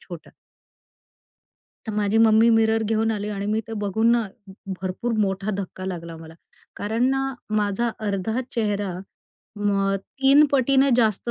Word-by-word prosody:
छोटा. 170 -3 -11 1.6
तर 220 - -3
माझी 210 +1 +1
मम्मी 220 +1 +5
मिरर 225 0 +3
घेऊन 225 +1 0
आली. 210 -1 -3
आणि 200 -1 -4
मी 215 +1 0
ते - - -6
बघून 220 +4 +2
ना, 235 -2 +1 0.5
भरपूर 190 +6 -3
मोठा 195 +1 -1
धक्का 185 -1 -6
लागला 170 -3 -6
मला. 160 0 -12 0.4
कारण 225 +4 -1
ना, 270 0 -1 0.2
माझा 210 +3 0 0.2
अर्धा 205 +5 -1
चेहरा, 205 -4 -1 0.6
मग 195 -1 +1 0.3
3 280 +3 +7
पटीने 275 0 +3
जास्त 225 0 +1
215 Hz, 140 wpm, -23 LUFS, 195-230 Hz, 1.6 s, 3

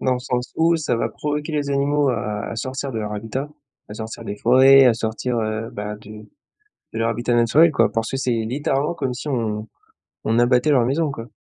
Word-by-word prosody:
Dans 130 - +1
le 125 - -3
sens 125 -1 -3
où 165 +1 +3
ça 150 -6 -1
va 115 0 -1
provoquer 150 +6 -4
les 145 -2 -1
animaux 140 +1 +1
à 105 -3 -3
à 115 - -6
sortir 130 +3 -4
de 110 - -3
leur 105 -1 -4
habitat, 115 +7 -4 0.4
à 105 - -8
sortir 110 0 -7
des 100 - -5
forêts, 130 +4 +6
à 120 - +5
sortir, 115 +2 -3
heu, 110 +1 -3
bah, 105 +1 -5
du 105 0 -12 0.7
de 115 - -4
leur 115 - +1
habitat 120 +1 -1
naturel 120 +8 +5
quoi, - - +2
parce 115 -1 -2
que 135 - -2
c'est 130 -2 -1
littéralement 135 +6 -1
comme 135 -6 -3
si 130 - -7
on 110 -5 -2 0.6
on 115 +2 +1
abattait 125 +3 +3
leur 130 -5 +4
maison 145 +3 0
quoi. 115 -4 -8
125 Hz, 215 wpm, -21 LUFS, 110-140 Hz, 0.7 s, forêts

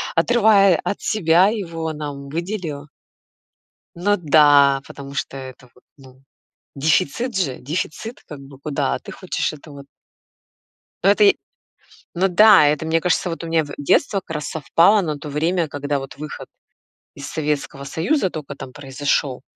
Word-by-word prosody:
отрывая 200 -2 +4
от 200 - -3
себя 180 -3 +3
его 165 -7 -3
нам 145 -2 -7
выделила. 165 -3 -5 1.1
Ну 205 +4 +1
да, 145 -4 +5
потому 140 0 -10
что 135 - -4
это 130 -1 -11
вот, 125 - -23
ну, 130 -1 -18 0.5
дефицит 155 - 0
же, 150 -10 -1
дефицит 165 - -5
как 150 -2 -10
бы, 135 0 -14
куда, 140 - -2
а - - -3
ты - - -10
хочешь - - -3
это 155 0 -13
вот. 140 -1 -11 1.2
Ну - - +5
это 425 - +4
и, 400 -1 +5 0.8
ну 185 +2 +1
да, 200 -1 +7
это, 150 +1 0
мне 165 +1 +1
кажется, 180 +1 0
вот 165 0 -5
у - - -5
меня 165 -1 +1
в 145 - -10
детство 145 +7 +1
как 160 - -8
раз 150 -1 -4
совпало 170 +7 +3
на 155 -5 -3
то 150 +1 -8
время, 165 +4 0
когда, 145 -1 -3
вот, 135 0 -9
выход 150 +1 -8 0.7
из 140 0 -8
Советского 145 -2 -3
Союза 190 - 0
тока 155 -4 -7
там 135 -1 -9
произошёл, 135 -1 -2
155 Hz, 160 wpm, -21 LUFS, 140-180 Hz, 1.2 s, да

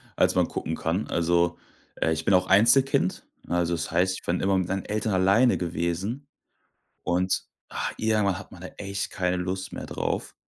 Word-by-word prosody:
als - - +3
man - - +3
gucken - - -4
kann. 85 +6 -2
Also, 85 0 +1 0.4
äh, 80 - 0
ich 80 0 -2
bin 100 - +3
auch 90 0 +4
Einzelkind, 115 -2 +4 0.2
ne, 85 - -3
also, 85 0 +1
das 80 -1 -2
heißt, 90 +2 +2
ich - - -10
bin 85 +1 0
immer 95 0 +2
mit 90 -1 0
meinen 95 0 -2
Eltern 105 0 -1
alleine 100 +7 +4
gewesen 90 - -3 0.8
und, 90 +1 +1 0.3
ah - - -3
irgendwann, 105 -4 +1
hat 105 - -12
man 90 - -12
da 95 - -6
echt 100 -1 -3
keine 90 0 0
Lust 95 +1 -3
mehr - - -6
drauf - - -3
95 Hz, 190 wpm, -26 LUFS, 85-100 Hz, 0.8 s, auch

